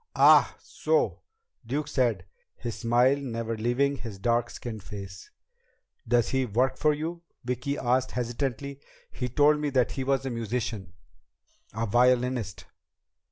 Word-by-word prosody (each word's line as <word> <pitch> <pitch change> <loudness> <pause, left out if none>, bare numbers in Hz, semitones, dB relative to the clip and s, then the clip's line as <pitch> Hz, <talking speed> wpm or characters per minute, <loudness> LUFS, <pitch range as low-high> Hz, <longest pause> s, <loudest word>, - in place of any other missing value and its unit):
"Ah, - - +6
so," 470 0 0 0.4
Duke 140 +5 -2
said, 120 - 0 0.3
his 120 -1 -5
smile 120 +4 +3
never 115 -4 -3
leaving 125 +5 +1
his 115 -5 -7
dark 120 +3 +1
skinned 110 -3 -7
face. 95 0 -9 0.8
"Does 120 0 +3
does - - -5
he 130 0 +1
work 125 +5 +1
for 150 - +2
you?" 160 +3 -4 0.2
Vicki 125 +3 -2
asked 130 +1 0
hesitantly. 130 +3 -3 0.3
"He 125 -1 -4
told 150 +4 +4
me 150 -1 -1
that 130 -3 +2
he 135 - -3
was 135 0 0
a 135 - -2
musician, 115 -5 -3 0.8
a 115 +2 -2
violinist." 125 -1 +1
125 Hz, 140 wpm, -27 LUFS, 115-135 Hz, 0.8 s, Ah